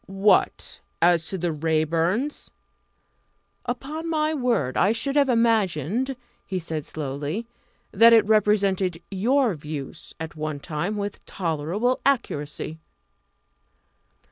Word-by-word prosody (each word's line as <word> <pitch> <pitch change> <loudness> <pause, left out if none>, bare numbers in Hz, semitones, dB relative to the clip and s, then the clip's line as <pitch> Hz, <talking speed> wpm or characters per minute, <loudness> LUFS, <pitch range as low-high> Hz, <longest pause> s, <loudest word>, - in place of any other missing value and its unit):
"What! 195 +2 +2 0.2
as 170 -1 +3
to 190 - -2
the 175 -1 -1
Raeburns? 165 - 0 1.2
Upon 300 +7 -4
my 310 -1 +1
word, 235 - 0
I 195 +4 +3
should 275 +5 -2
have 285 -2 +4
imagined," 230 - +1 0.3
he 190 - -4
said 160 -4 -4
slowly, 150 - -4 0.5
"that 230 +3 +7
it 225 -2 +6
represented 195 -5 +2
your 235 +4 +2
views 150 -3 -7
at 160 0 -6
one 155 -2 -4
time 170 +8 -3
with 205 0 -4
tolerable 180 +8 -1
accuracy." 160 - -1
195 Hz, 110 wpm, -24 LUFS, 160-235 Hz, 1.2 s, that